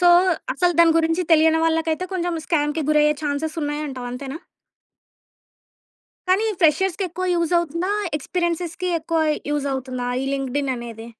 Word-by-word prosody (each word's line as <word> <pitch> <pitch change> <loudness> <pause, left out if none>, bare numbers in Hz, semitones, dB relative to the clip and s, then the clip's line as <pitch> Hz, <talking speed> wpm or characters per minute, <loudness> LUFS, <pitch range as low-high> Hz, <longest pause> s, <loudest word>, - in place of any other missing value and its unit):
So 355 - +4 0.5
అసలు 355 -1 +2
దాని 335 -1 +7
గురించి 325 +2 +1
తెలియని 320 0 +5
వాళ్ళకయితే 325 +1 0
కొంచెం 350 -2 -1
స్కామ్‌కి 300 -1 0
గురి 305 0 +4
అయ్యే 300 0 +3
ఛాన్సెస్ 300 +2 -2
ఉన్నాయి 295 +1 -2
అంటావు. 255 -3 -6
అంతేనా? 275 +4 -6 1.9
కానీ 380 +4 +3 0.2
ఫ్రెషర్స్‌కి 350 +4 +2
ఎక్కువ 365 +2 -4
యూజవుతుందా, 340 +1 0 0.3
ఎక్స్‌పీరియెన్సెస్‌కి 345 +2 -2
ఎక్కువ 325 +1 -1 0.3
యూజవుతుందా 265 -3 -2
ఈ - - -2
లింక్డ్‌ఇన్ 275 0 -1
అనేది? 230 -1 -8
320 Hz, 130 wpm, -22 LUFS, 285-340 Hz, 1.9 s, దాని